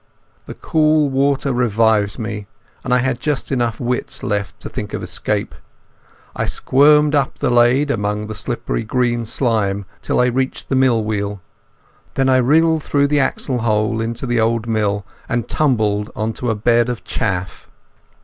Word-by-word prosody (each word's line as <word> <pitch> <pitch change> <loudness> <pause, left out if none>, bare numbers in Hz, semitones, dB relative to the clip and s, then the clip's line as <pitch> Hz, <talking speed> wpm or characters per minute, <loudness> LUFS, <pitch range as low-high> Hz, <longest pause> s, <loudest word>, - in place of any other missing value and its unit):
The - - -7
cool 155 -2 +2
water 140 0 +1
revived 110 -4 +2
me, 105 -3 -5 0.4
and 125 - -4
I 125 - +5
had 130 -1 0
just 145 0 -2
enough 120 -4 -1
wits 125 +1 -3
left 105 -1 -2
to - - -5
think - - -5
of - - -5
escape. - - -2 0.8
I - - -1
squirmed 150 +2 +4
up 140 -2 0
the 140 -4 0
lade 120 +4 +3
among 105 -2 -2
the 110 - -6
slippery - - -3
green 120 0 0
slime 105 -5 0 0.2
till - - -1
I 125 - +4
reached 130 +2 -2
the 135 - +1
mill 130 -4 +3
wheel. 105 -1 -3 0.8
Then 135 0 +2
I 130 - +5
wriggled 160 +5 +3
through 140 0 +1
the 145 0 +2
axle 130 -2 0
hole 110 0 0
into 115 +3 -3
the 120 -2 0
old 115 0 +1
mill 105 -3 -1 0.2
and 120 -1 -1
tumbled 110 -8 0
on 110 +1 -2
to 125 - -3
a 110 - +1
bed 120 +3 +2
of 120 -2 -4
chaff. 95 -6 -3
120 Hz, 170 wpm, -19 LUFS, 110-135 Hz, 0.8 s, I